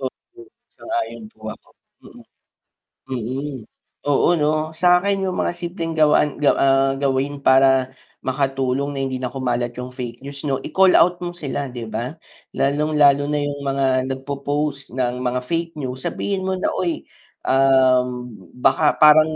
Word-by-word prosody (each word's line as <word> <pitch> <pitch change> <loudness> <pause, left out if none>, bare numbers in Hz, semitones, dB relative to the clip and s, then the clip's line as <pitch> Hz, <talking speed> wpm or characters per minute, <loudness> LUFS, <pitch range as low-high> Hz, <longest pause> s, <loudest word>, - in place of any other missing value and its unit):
Mm. 360 - -9 0.3
Sang-ayon 335 -8 -4
po 225 - -31
ako. - - -26 0.3
Mm. - - -14 0.9
Mm. 130 +3 -4 0.5
Oo 145 -1 +3
'no, 155 +1 0
sakin 180 +4 +2
yung 185 - -2
mga - - 0
simpleng 175 -1 -5
gawain 150 -2 +3
gaw, 150 - +4
ah, 135 0 +3
gawin 140 +1 -1
para 130 -1 +4 0.3
makatulong 135 0 -1
na - - -3
hindi 130 -1 -3
na 125 - -2
kumalat 120 -2 -2
yung 125 0 -6
fake 125 -1 -7
news 140 0 -7
'no, 135 - +1
i-call 190 +4 +4
out 175 +1 +4
mo 175 0 -5
sila 140 -3 -4
'di 120 -2 -7
ba? 125 +6 -4 0.4
Lalong 150 +3 0
lalo 145 -1 +5
na 150 0 0
yung 145 0 -3
mga 135 -2 0
nagpopost 140 0 -3
ng 125 -1 -1
mga 125 0 -1
fake 165 +4 -2
news, 130 -3 -5
sabihin 190 -2 -3
mo 190 - 0
na, 185 - -1
"Uy, 175 -3 -2 0.4
ah, 130 -1 +4 0.5
baka 150 +4 +3
parang 155 +1 +6
140 Hz, 150 wpm, -21 LUFS, 130-155 Hz, 0.9 s, parang